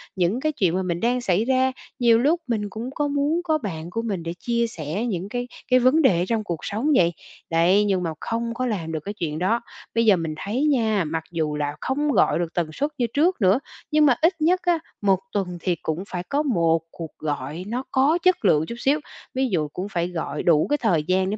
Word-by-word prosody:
những 185 Hz, +6 st, +1 dB
cái 310 Hz, +2 st, 0 dB
chuyện 190 Hz, -, +1 dB
mà 190 Hz, -, 0 dB
mình 175 Hz, -1 st, -2 dB
đang 245 Hz, +2 st, +1 dB
xảy 200 Hz, +1 st, +1 dB
ra. 260 Hz, 0 st, +2 dB, 0.3 s
Nhiều 235 Hz, -2 st, +5 dB
lúc 310 Hz, +7 st, +2 dB
mình 215 Hz, -4 st, -1 dB
cũng 225 Hz, +5 st, -5 dB
có 295 Hz, -1 st, 0 dB
muốn 285 Hz, +4 st, +1 dB
có 315 Hz, -3 st, +1 dB
bạn 170 Hz, -, -5 dB
của 230 Hz, +5 st, -2 dB
mình 195 Hz, -7 st, -3 dB
để 170 Hz, 0 st, -4 dB
chia 235 Hz, -1 st, 0 dB
sẻ 170 Hz, +3 st, -4 dB
những 195 Hz, -3 st, -3 dB
cái 245 Hz, +1 st, -3 dB, 0.2 s
cái 255 Hz, -, +6 dB
vấn 260 Hz, +6 st, +4 dB
đề 190 Hz, -, +4 dB
ở -, -, 0 dB
trong 225 Hz, -2 st, 0 dB
cuộc 170 Hz, -5 st, -4 dB
sống 225 Hz, +9 st, -1 dB
vậy. 170 Hz, -4 st, +4 dB, 0.4 s
Đấy, 175 Hz, +5 st, +4 dB
nhưng 190 Hz, -3 st, +1 dB
mà 165 Hz, -, -1 dB
không 230 Hz, 0 st, -2 dB
có 255 Hz, +2 st, -2 dB
làm 185 Hz, -9 st, -2 dB
được 160 Hz, -, -2 dB
cái 205 Hz, -, -4 dB
chuyện 160 Hz, -6 st, -3 dB
đó. 225 Hz, +6 st, +1 dB, 0.3 s
Bây 230 Hz, 0 st, +3 dB
giờ 205 Hz, -3 st, +6 dB
mình 165 Hz, -2 st, -3 dB
thấy 220 Hz, -, -2 dB
nha, 220 Hz, -, +2 dB
mặc 160 Hz, +1 st, -3 dB
dù 155 Hz, -3 st, -1 dB
là 145 Hz, 0 st, -2 dB
không 290 Hz, +3 st, 0 dB
gọi 195 Hz, -, +3 dB
được 170 Hz, -1 st, -3 dB
tần 165 Hz, -3 st, -1 dB
suất 290 Hz, -, -1 dB
như 240 Hz, -3 st, +1 dB
trước 330 Hz, +1 st, +2 dB
nữa, 195 Hz, +6 st, +4 dB, 0.3 s
nhưng 305 Hz, 0 st, +5 dB
mà 260 Hz, -4 st, +5 dB
ít 340 Hz, +4 st, +4 dB
nhất 360 Hz, +4 st, +3 dB
á, 350 Hz, -2 st, +2 dB, 0.2 s
một 195 Hz, -2 st, +3 dB
tuần 180 Hz, -3 st, -2 dB
thì 180 Hz, -2 st, 0 dB
cũng 160 Hz, +4 st, -2 dB
phải 180 Hz, -1 st, -4 dB
có 290 Hz, +2 st, +1 dB
1 165 Hz, -, +2 dB
cuộc 165 Hz, -2 st, -9 dB
gọi 150 Hz, +2 st, -4 dB
nó 245 Hz, +4 st, -2 dB
có 280 Hz, +5 st, +3 dB
chất 365 Hz, -, +3 dB
lượng 160 Hz, -3 st, +4 dB
chút 235 Hz, -, -6 dB
xíu, 285 Hz, +4 st, +2 dB, 0.3 s
ví 265 Hz, 0 st, +1 dB
dụ 155 Hz, -6 st, 0 dB
cũng 185 Hz, +6 st, -5 dB
phải 175 Hz, -2 st, -1 dB
gọi 170 Hz, -3 st, -4 dB
đủ 160 Hz, -3 st, +4 dB
cái 295 Hz, -, +2 dB
thời 180 Hz, -, +1 dB
gian 185 Hz, +3 st, +1 dB
để 210 Hz, -, -2 dB
210 Hz, 245 wpm, -23 LUFS, 170-255 Hz, 0.4 s, cái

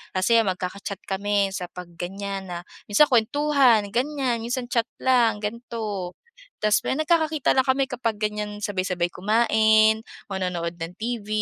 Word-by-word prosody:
Kasi 210 Hz, +5 st, +4 dB
magkaka-chat 195 Hz, -1 st, -3 dB
kami 200 Hz, 0 st, 0 dB
sa 185 Hz, -2 st, -4 dB
pag 180 Hz, 0 st, -10 dB
ganyan 195 Hz, +1 st, -5 dB
na 175 Hz, -1 st, -5 dB, 0.3 s
minsan 240 Hz, +9 st, +4 dB
kuwentuhan 245 Hz, -3 st, +3 dB
ganyan, 255 Hz, 0 st, 0 dB
minsan 245 Hz, +2 st, -4 dB
chat 235 Hz, 0 st, +1 dB, 0.2 s
lang 235 Hz, -5 st, +3 dB
ganito. 210 Hz, -4 st, -4 dB, 0.5 s
Tapos 210 Hz, -1 st, +3 dB
may, -, -, +1 dB
nagkakakita 310 Hz, -2 st, +2 dB
lang 260 Hz, -, +4 dB
kami 270 Hz, +1 st, +2 dB
kapag 230 Hz, -4 st, -2 dB
ganyan, 210 Hz, -1 st, -3 dB
sabay-sabay 185 Hz, -4 st, -1 dB
kumain, 220 Hz, +1 st, +3 dB, 0.3 s
manonood 180 Hz, -3 st, -3 dB
ng 165 Hz, +1 st, -6 dB
TV, 230 Hz, -2 st, -4 dB
215 Hz, 135 wpm, -24 LUFS, 195-240 Hz, 0.5 s, Kasi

